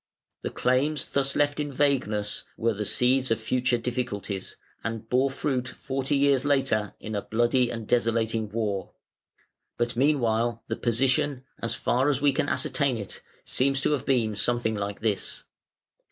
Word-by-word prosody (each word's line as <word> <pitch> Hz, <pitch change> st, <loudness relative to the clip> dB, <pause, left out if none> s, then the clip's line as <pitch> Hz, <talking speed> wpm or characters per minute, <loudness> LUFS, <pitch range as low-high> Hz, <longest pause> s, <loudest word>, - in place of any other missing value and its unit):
The -, -, -3 dB
claims 135 Hz, +5 st, +1 dB
thus 140 Hz, 0 st, 0 dB
left 145 Hz, 0 st, +1 dB
in 145 Hz, -1 st, -2 dB
vagueness 125 Hz, -7 st, 0 dB
were 115 Hz, 0 st, +1 dB
the 105 Hz, +1 st, -3 dB
seeds 130 Hz, +4 st, +2 dB
of 115 Hz, -, +1 dB
future 125 Hz, +2 st, +1 dB
difficulties, 115 Hz, -5 st, -3 dB, 0.3 s
and 115 Hz, -1 st, -4 dB
bore 130 Hz, +3 st, +2 dB
fruit 130 Hz, -2 st, -1 dB
forty 135 Hz, +1 st, -2 dB
years 140 Hz, -2 st, +3 dB
later 135 Hz, -7 st, +1 dB
in 110 Hz, -, -6 dB
a 100 Hz, -, -1 dB
bloody 120 Hz, +3 st, +2 dB
and 115 Hz, -2 st, -5 dB
desolating 115 Hz, -2 st, +1 dB
war, 105 Hz, -4 st, -2 dB, 0.8 s
but 120 Hz, 0 st, -1 dB
meanwhile 120 Hz, -4 st, +1 dB
the -, -, -2 dB
position, 130 Hz, +3 st, +1 dB, 0.2 s
as 115 Hz, -, -1 dB
far 130 Hz, +4 st, +1 dB
as 140 Hz, -3 st, +1 dB
we 145 Hz, -1 st, +3 dB
can 140 Hz, -, 0 dB
ascertain 140 Hz, -5 st, +1 dB
it, 100 Hz, -3 st, -6 dB, 0.2 s
seems 135 Hz, +1 st, +1 dB
to -, -, +2 dB
have 145 Hz, -5 st, -1 dB
been 120 Hz, -6 st, +2 dB
something 110 Hz, +2 st, +1 dB
like 100 Hz, -1 st, -4 dB
this. 110 Hz, -3 st, -1 dB
120 Hz, 155 wpm, -27 LUFS, 110-135 Hz, 0.8 s, years